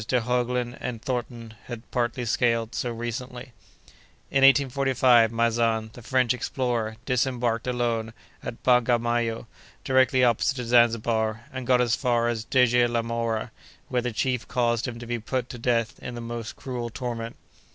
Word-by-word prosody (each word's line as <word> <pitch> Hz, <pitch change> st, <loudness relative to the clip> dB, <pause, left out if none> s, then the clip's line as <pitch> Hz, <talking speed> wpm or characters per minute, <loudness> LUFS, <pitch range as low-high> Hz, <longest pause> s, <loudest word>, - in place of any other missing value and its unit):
de 125 Hz, -, +2 dB
Heuglin 125 Hz, +1 st, -1 dB
and 115 Hz, -2 st, -4 dB
Thornton 120 Hz, -3 st, -4 dB
have 120 Hz, -1 st, -9 dB
partly 120 Hz, 0 st, -1 dB
scaled 115 Hz, 0 st, +1 dB
so 125 Hz, -, -2 dB
recently. 120 Hz, +2 st, -6 dB, 0.8 s
In 135 Hz, -1 st, +3 dB
1845, 135 Hz, -4 st, +4 dB
Maizan, 115 Hz, -1 st, +1 dB
the 120 Hz, -, -11 dB
French 125 Hz, +1 st, +2 dB
explorer, 120 Hz, -3 st, -2 dB
disembarked, 125 Hz, -2 st, 0 dB
alone, 120 Hz, -3 st, -1 dB, 0.3 s
at 115 Hz, -, -7 dB
Bagamayo, 120 Hz, -2 st, +2 dB, 0.4 s
directly 130 Hz, -1 st, +3 dB
opposite 120 Hz, +2 st, +2 dB
to 125 Hz, -2 st, -4 dB
Zanzibar, 115 Hz, -1 st, +2 dB
and 130 Hz, -2 st, -5 dB
got 125 Hz, -1 st, +4 dB
as 120 Hz, -1 st, +2 dB
far 120 Hz, -3 st, +1 dB
as 110 Hz, -2 st, -3 dB
Deje 125 Hz, -1 st, +3 dB
la 115 Hz, -1 st, 0 dB
Mhora, 115 Hz, 0 st, -2 dB, 0.4 s
where 125 Hz, -1 st, +1 dB
the 125 Hz, 0 st, -2 dB
chief 125 Hz, +2 st, -1 dB
caused 120 Hz, -1 st, 0 dB
him 120 Hz, -1 st, -5 dB
to 120 Hz, -, -8 dB
be 120 Hz, 0 st, -3 dB
put 125 Hz, +3 st, -3 dB
to 125 Hz, -, -8 dB
death 115 Hz, -1 st, 0 dB
in 120 Hz, -, -6 dB
the -, -, -5 dB
most 115 Hz, -1 st, -6 dB
cruel 125 Hz, -3 st, -5 dB
torment. 115 Hz, -1 st, -5 dB
120 Hz, 155 wpm, -26 LUFS, 115-125 Hz, 0.8 s, 1845